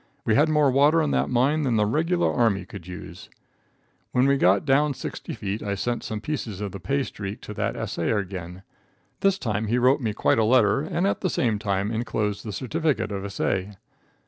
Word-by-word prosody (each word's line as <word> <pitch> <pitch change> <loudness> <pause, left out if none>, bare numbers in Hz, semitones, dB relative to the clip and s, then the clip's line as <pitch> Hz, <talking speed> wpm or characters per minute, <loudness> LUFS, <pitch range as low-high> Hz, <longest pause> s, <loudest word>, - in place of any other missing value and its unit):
We 110 - +2
had 150 +8 +4
more 150 -3 +3
water 145 +5 +4
in 150 - 0
that - - +1
mine 135 +5 +2
than 130 -5 +1
the 105 -1 +3
regular 165 +10 +1
army 105 -6 +1
could 95 -2 -10
use. 90 -1 -9 0.8
When 125 +1 +3
we 140 0 +4
got 100 - +3
down 140 +1 +3
sixty - - -6
feet 100 +2 -4
I 100 -1 -2
sent 120 +4 -2
some 110 -1 -4
pieces 115 -8 -4
of 105 -2 -4
the 100 - -7
pay 140 +8 0
streak 100 -3 -6
to 105 - -7
the - - -2
assayer 110 - -1
again. 95 -2 -6 0.6
This 195 -1 +2
time 110 - -2
he 120 +3 +1
wrote 130 +3 +3
me 110 -3 -1
quite 110 - +2
a - - +4
letter, 115 +1 +4
and 165 +4 -1
at 200 - 0
the 185 - 0
same 115 -9 0
time 100 0 -1
inclosed 110 -3 -2
the 110 - -5
certificate 130 -2 -1
of 100 -1 -4
assay. 100 0 -2
115 Hz, 205 wpm, -25 LUFS, 100-140 Hz, 0.8 s, had